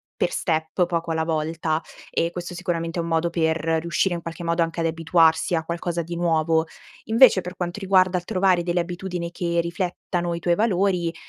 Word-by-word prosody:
per - - 0
step, 160 +1 0
poco 170 -1 -2
alla 160 0 0
volta. 160 0 -1 0.3
E 170 +1 0
questo 175 0 -6
sicuramente 170 -1 -3
è - - +2
un 165 - -4
modo 165 +1 +1
per 160 -1 +1 0.2
riuscire 170 +2 0
in 170 - -4
qualche 165 +1 -7
modo 170 0 0
anche 165 0 -1
ad 165 - 0
abituarsi 165 +1 +2
a 160 - -2
qualcosa 170 0 -2
di 170 +1 -6
nuovo. 165 -1 +2 0.4
Invece 225 -3 +6
per 180 +1 -8
quanto 175 +2 -3
riguarda 185 -2 +3
il - - -14
trovare 185 -1 +2
delle 175 0 0
abitudini 175 0 -4
che 170 -1 -1
riflettano 175 0 -2
i - - -5
tuoi 175 0 +1
valori, 185 -5 +1
170 Hz, 190 wpm, -23 LUFS, 165-180 Hz, 0.4 s, Invece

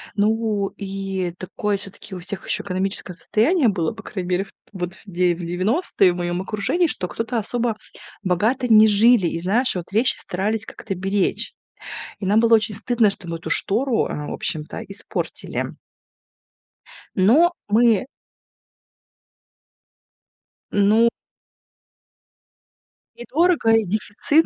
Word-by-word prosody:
Ну, 215 -1 +1
и 195 -2 -3
такое 200 +2 -2
всё-таки 200 0 -8
у - - -6
всех 190 +2 -6
еще - - +2
экономическое 190 0 -2
состояние 245 - +2
было, 170 -6 -1
по - - -11
крайней 185 -3 -5
мере, 185 +1 +1
в - - -18 0.2
вот 180 -1 -4
в - - -16
девя 180 -2 +1
девяностые 185 - +2
в - - -7
моем 175 0 -2
окружении, 215 - 0
что 180 - -3
кто-то 225 +4 -3
особо 230 +1 -1 0.5
богато 215 +8 +1
не 220 -1 +7
жили. 215 -2 +5
И 165 - -3
знаешь, 210 +9 +1
вот 180 0 -5
вещи 225 +6 +4
старались 210 +4 -2
как-то 195 -3 -6
беречь. 195 +2 -1 0.7
И 200 - -4
нам 205 +3 +4
было 230 0 +6
очень 210 -1 0
стыдно, 225 0 +2
что 195 -3 -8
мы 165 0 -3
эту 165 - -7
штору, 235 +4 +1
а, 150 0 -4
в - - -4
общем-то 150 -1 -3
испортили. 195 +1 -4 1.5
Но 280 - +5 0.2
мы 225 0 +4 2.6
Ну 210 +3 +4 2.1
И 240 - -9
дорого, 335 -5 +3
и 225 -1 +4
дефицит. 215 - +1
205 Hz, 135 wpm, -22 LUFS, 185-225 Hz, 2.6 s, не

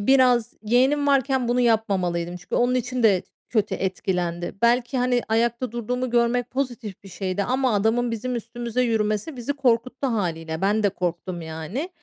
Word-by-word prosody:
biraz 250 0 +4
yeğenim 260 +6 +3
varken 265 -3 +2
bunu 245 +1 +2
yapmamalıydım. 185 -7 +1
Çünkü 180 - -7
onun 245 +1 +2
için 250 0 -1
de 195 -5 +4 0.3
kötü 215 -4 +1
etkilendi. 180 -2 -2
Belki, 245 +2 +2
hani, 245 -1 +2
ayakta 235 +1 0
durduğumu 250 +2 -2
görmek 240 0 +1
pozitif 245 -7 -4
bir - - -10
şeydi 185 +1 -2
ama 255 -2 +1
adamın 225 +4 +2
bizim 245 +3 -3
üstümüze 235 +1 -3
yürümesi, 220 +4 0
bizi 245 +4 -2
korkuttu 255 0 +1
hâliyle. 165 -7 -2
Ben 210 +2 +2
de 205 - +4
korktum 175 -1 -3
yani. 160 - -5
235 Hz, 155 wpm, -24 LUFS, 195-250 Hz, 0.3 s, biraz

